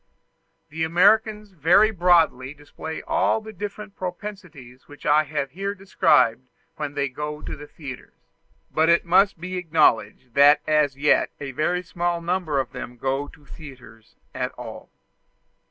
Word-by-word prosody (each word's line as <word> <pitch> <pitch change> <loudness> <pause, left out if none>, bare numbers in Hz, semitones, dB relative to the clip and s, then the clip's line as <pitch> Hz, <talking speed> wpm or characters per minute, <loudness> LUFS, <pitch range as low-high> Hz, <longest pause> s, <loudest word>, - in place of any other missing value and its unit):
The 160 +2 -3
Americans 210 +5 +2
very 180 +6 +4
broadly 165 - +2
display 155 +2 -8
all - - +1
the 220 0 -11
different 205 +1 -7
propensities 180 -9 -8
which 145 - -14
I 155 +1 +4
have 145 -2 -3
here 195 +5 -4
described 130 - +2 0.3
when 145 -2 -5
they 140 -1 0
go 150 +3 -6
to - - -6
the 150 0 -11
theatres; 140 -6 -10 0.6
but 160 +1 +2
it 170 +1 +4
must 190 +1 +3
be 185 +2 -5
acknowledged 150 - +1
that 145 +2 +6
as 150 -3 +1
yet 150 +2 +3
a 140 -2 -6
very 175 +7 -1
small 175 0 -2
number 170 -4 -1
of 130 - -3
them 120 +1 -8
go 135 +3 -2
to 145 0 -18
theatres 125 -8 -14 0.2
at - - -3
all. - - -10
155 Hz, 150 wpm, -23 LUFS, 140-180 Hz, 0.6 s, that